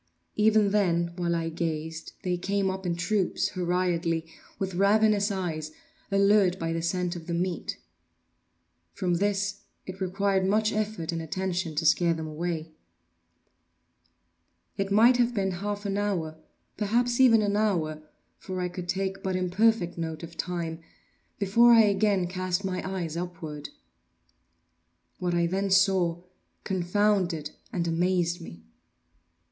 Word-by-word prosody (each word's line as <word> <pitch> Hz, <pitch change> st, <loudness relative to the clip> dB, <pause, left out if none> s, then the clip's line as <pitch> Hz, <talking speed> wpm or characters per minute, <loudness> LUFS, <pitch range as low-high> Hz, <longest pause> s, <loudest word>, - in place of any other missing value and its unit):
Even 215 Hz, -1 st, +4 dB
then, 170 Hz, -4 st, +1 dB
while 175 Hz, -1 st, 0 dB
I 165 Hz, -1 st, -1 dB
gazed, 160 Hz, -1 st, -4 dB
they 180 Hz, -1 st, 0 dB
came 195 Hz, +2 st, 0 dB
up 190 Hz, -1 st, -5 dB
in 170 Hz, -, 0 dB
troops, 190 Hz, +1 st, 0 dB
hurriedly, 175 Hz, -3 st, 0 dB, 0.3 s
with 190 Hz, -1 st, -3 dB
ravenous 205 Hz, +2 st, +3 dB
eyes, 165 Hz, -6 st, -3 dB, 0.4 s
allured 200 Hz, -2 st, +4 dB
by 165 Hz, -2 st, -2 dB
the 165 Hz, -, -2 dB
scent 180 Hz, +1 st, -1 dB
of 165 Hz, -1 st, -9 dB
the 170 Hz, -, -1 dB
meat. 180 Hz, +1 st, -2 dB, 1.2 s
From 180 Hz, -3 st, 0 dB
this 205 Hz, +1 st, 0 dB, 0.3 s
it 190 Hz, +1 st, -8 dB
required 190 Hz, +1 st, +1 dB
much 215 Hz, +2 st, +2 dB
effort 210 Hz, -6 st, -2 dB
and 165 Hz, -1 st, -3 dB
attention 180 Hz, -1 st, -3 dB
to 160 Hz, +2 st, -1 dB
scare 170 Hz, +1 st, +4 dB
them 160 Hz, 0 st, -5 dB
away. 160 Hz, +1 st, -4 dB, 2.0 s
It 195 Hz, 0 st, -2 dB
might 235 Hz, +5 st, +6 dB
have 240 Hz, 0 st, +2 dB
been 195 Hz, -2 st, 0 dB
half 205 Hz, +3 st, -4 dB
an 200 Hz, 0 st, -1 dB
hour, 175 Hz, -7 st, -1 dB, 0.4 s
perhaps 235 Hz, +4 st, +1 dB
even 230 Hz, -4 st, +6 dB
an 205 Hz, 0 st, 0 dB
hour, 170 Hz, -8 st, 0 dB, 0.4 s
(for 185 Hz, -1 st, -5 dB
I 180 Hz, 0 st, -1 dB
could 175 Hz, 0 st, -7 dB
take 195 Hz, 0 st, -2 dB
but 190 Hz, -1 st, -2 dB
imperfect 185 Hz, 0 st, +1 dB
note 160 Hz, -1 st, -4 dB
of 165 Hz, 0 st, -9 dB
time) 170 Hz, -2 st, -3 dB, 0.6 s
before 230 Hz, +4 st, +5 dB
I 230 Hz, -, +8 dB
again 200 Hz, -2 st, +2 dB
cast 185 Hz, +1 st, -2 dB
my 185 Hz, -1 st, -2 dB
eyes 170 Hz, -4 st, -3 dB
upward. 165 Hz, -4 st, -6 dB, 1.5 s
What 175 Hz, -1 st, -1 dB
I 170 Hz, 0 st, +2 dB
then 195 Hz, +3 st, -1 dB
saw 190 Hz, -3 st, +3 dB, 0.4 s
confounded 185 Hz, -4 st, 0 dB, 0.2 s
and 170 Hz, -2 st, -1 dB
amazed 175 Hz, +1 st, +1 dB
me. 85 Hz, -, -11 dB
185 Hz, 140 wpm, -27 LUFS, 170-200 Hz, 2.0 s, I